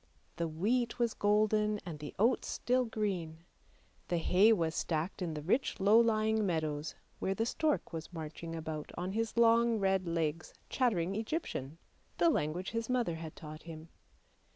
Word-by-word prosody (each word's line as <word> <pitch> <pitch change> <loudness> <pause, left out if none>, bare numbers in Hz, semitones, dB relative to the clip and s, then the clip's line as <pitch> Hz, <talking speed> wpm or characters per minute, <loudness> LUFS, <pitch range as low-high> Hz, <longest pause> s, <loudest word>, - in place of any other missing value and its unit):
The 170 - 0
wheat 230 +10 0
was 235 -2 +1
golden 210 0 +2
and 160 -4 -6
the 150 -1 -8
oats 235 +5 +2
still 250 +1 +1
green; 185 -8 -3 0.6
the 175 - 0
hay 185 +6 +5
was 165 -7 +2
stacked 165 +5 -2
in 165 -3 -2
the 150 - -5
rich 240 - 0
low 205 +4 +6
lying 220 -1 +2
meadows, 155 -4 -2 0.2
where 195 - -1
the 225 - 0
stork 300 - 0
was 160 +1 -6
marching 165 0 -6
about 155 -2 -5
on 180 +2 -2
his 225 +2 -2
long 230 0 +5
red 190 -2 +1
legs, 165 -1 -2 0.2
chattering 195 -9 +1
Egyptian, 215 - -3 0.4
the 335 - +4
language 175 - -1
his 230 0 -3
mother 245 -8 +1
had 160 -1 -8
taught 155 -1 -9
him. 160 -1 -10
190 Hz, 160 wpm, -33 LUFS, 160-225 Hz, 0.6 s, low